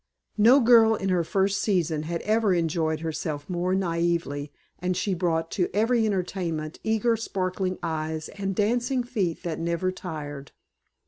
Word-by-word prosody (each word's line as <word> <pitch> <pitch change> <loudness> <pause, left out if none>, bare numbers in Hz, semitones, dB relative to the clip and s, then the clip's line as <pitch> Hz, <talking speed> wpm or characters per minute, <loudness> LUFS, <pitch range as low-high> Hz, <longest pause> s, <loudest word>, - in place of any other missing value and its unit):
No 240 +6 +7
girl 230 -3 +6
in 195 -2 -2
her 180 -2 +2
first 195 +3 +1
season 170 -7 +1
had 170 -1 -3
ever 215 -3 +2
enjoyed 160 -2 0
herself 155 -2 -4
more 180 +1 0
naively 170 -5 -1 0.3
and 180 0 -1
she 190 +1 0
brought 165 -2 -1
to 180 -4 0
every 225 +1 +3
entertainment 175 -5 -3
eager 220 +1 +2
sparkling 185 -3 -2
eyes 160 0 -3
and 195 -1 -4
dancing 245 +5 +1
feet 205 -9 -2
that 165 -2 -3
never 170 +2 -1
tired. 145 -6 -7
180 Hz, 145 wpm, -26 LUFS, 165-210 Hz, 0.3 s, No